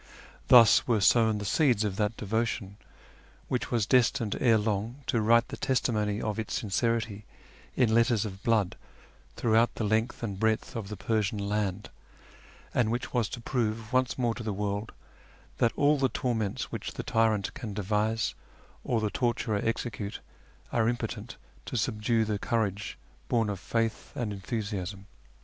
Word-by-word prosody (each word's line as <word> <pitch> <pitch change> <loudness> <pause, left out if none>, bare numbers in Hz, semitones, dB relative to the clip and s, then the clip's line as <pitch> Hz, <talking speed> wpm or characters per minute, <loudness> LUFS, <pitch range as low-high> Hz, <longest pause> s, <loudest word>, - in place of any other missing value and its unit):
Thus 120 -3 +7
were 115 -3 +3
sown 110 +2 +4
the 105 - -5
seeds 120 -1 +3
of 105 -3 -1
that 105 +1 0
devotion 110 -1 -2 0.7
which 125 - -1
was 115 -4 +1
destined 120 -2 +2
ere 115 -3 +5
long 110 +5 -2
to 115 - +1
write 115 +2 +4
the - - -6
testimony 110 -6 0
of 110 0 -2
its 110 - -3
sincerity 110 0 -1 0.5
in 120 -4 +3
letters 115 -1 +3
of 95 -2 -7
blood 110 -5 +1 0.6
throughout 115 +1 +2
the - - -3
length 110 +3 0
and 100 -4 -3
breadth 110 0 0
of 110 -4 -4
the 105 0 -6
Persian 105 +1 0
land, 100 -1 -2 0.8
and 120 -3 +2
which 120 +1 -3
was 120 -5 +1
to 120 - -6
prove 115 -1 -2
once 130 -1 +2
more 120 -3 +1
to 120 - -7
the 110 -2 -2
world 105 +1 -2 0.7
that 115 - +3
all 145 0 +3
the 135 -1 +2
torments 115 -3 -2
which - - -5
the - - -5
tyrant 110 -3 +1
can 115 -9 -6
devise 105 +2 0 0.5
or 115 -3 0
the 105 -1 -1
torturer 115 -4 0
execute 115 -2 -3 0.5
are 115 -1 +2
impotent 120 0 -4 0.3
to - - -3
subdue 110 0 +1
the 105 -1 -2
courage 100 -5 -1 0.3
born 115 -3 +2
of 100 - -5
faith 115 +2 -2
and 110 -4 -2
enthusiasm. 100 -2 -4
110 Hz, 160 wpm, -29 LUFS, 105-120 Hz, 0.8 s, Thus